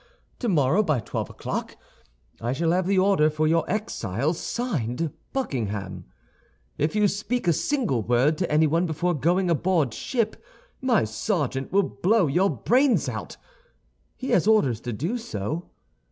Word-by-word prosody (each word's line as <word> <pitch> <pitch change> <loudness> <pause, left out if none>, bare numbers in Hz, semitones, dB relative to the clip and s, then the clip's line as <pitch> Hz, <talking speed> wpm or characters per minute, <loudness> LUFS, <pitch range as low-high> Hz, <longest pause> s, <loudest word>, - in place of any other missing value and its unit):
Tomorrow, 175 - +2
by 155 - +1
twelve - - -4
o'clock, - - -5 0.6
I 120 +2 -1
shall 165 +4 +1
have 180 +1 +1
the 195 0 +2
order 185 -5 +4
for 155 0 0
your 165 +1 +1
exile, 150 - -1
signed, 160 - -2 0.2
Buckingham. 105 - -3 0.7
If 150 +7 0
you 210 -1 +4
speak 210 +2 -2
a 170 - +5
single 225 - 0
word 125 +8 +2
to 175 - -1
anyone 160 +3 +3
before 175 +3 0
going 175 +6 +1
aboard 165 -6 +1
ship, 230 -4 -2 0.4
my 255 -4 +3
sergeant 135 - -2
will 200 +2 +4
blow 200 +2 +2
your 175 +7 +2
brains 250 - +2
out. - - -5 0.8
He 260 - -4
has 185 - +3
orders 140 - +3
to 120 - -4
do 165 - -2
so. 155 - -4
165 Hz, 145 wpm, -25 LUFS, 135-200 Hz, 0.8 s, a